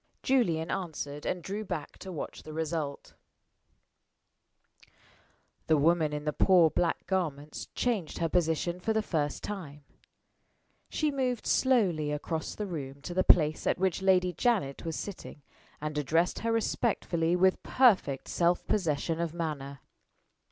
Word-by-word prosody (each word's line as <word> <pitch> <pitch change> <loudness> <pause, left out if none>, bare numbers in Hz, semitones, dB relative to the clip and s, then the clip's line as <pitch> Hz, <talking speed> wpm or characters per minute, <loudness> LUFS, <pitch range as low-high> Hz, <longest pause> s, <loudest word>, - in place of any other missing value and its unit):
Julian 170 -12 +2
answered, 150 -5 -4
and 180 -2 -2
drew 205 +3 -4
back 175 -7 -5
to 190 - -7
watch 160 - -6
the 155 - -9
result. 160 -2 -3 2.5
The 155 - +4
woman 160 +1 +3
in 150 0 -4
the 150 - 0
poor 175 -3 +5
black 170 -2 0
garments 155 -6 -3
changed 220 -10 -1
her 165 - +1
position 170 +1 0
for 220 +5 0
the 220 0 +1
first 150 -7 -2
time. 155 -8 -6 1.1
She 305 -1 0
moved 255 -4 -1
slowly 185 - +2
across 155 +2 -3
the 210 - -3
room 140 -7 -6
to 175 - -5
the 185 +1 +2
place 155 -2 +4
at - - +2
which 190 0 0
Lady 185 -1 +3
Janet 200 - 0
was 165 -1 -3
sitting, 180 -7 -7 0.4
and 150 0 -4
addressed 165 +5 +1
her 230 - -1
respectfully 180 -7 0
with 185 +1 +3
perfect 200 - +3
self 175 0 +1
possession 165 -4 0
of 170 -1 -2
manner. 140 -5 -4
170 Hz, 140 wpm, -30 LUFS, 150-190 Hz, 2.5 s, poor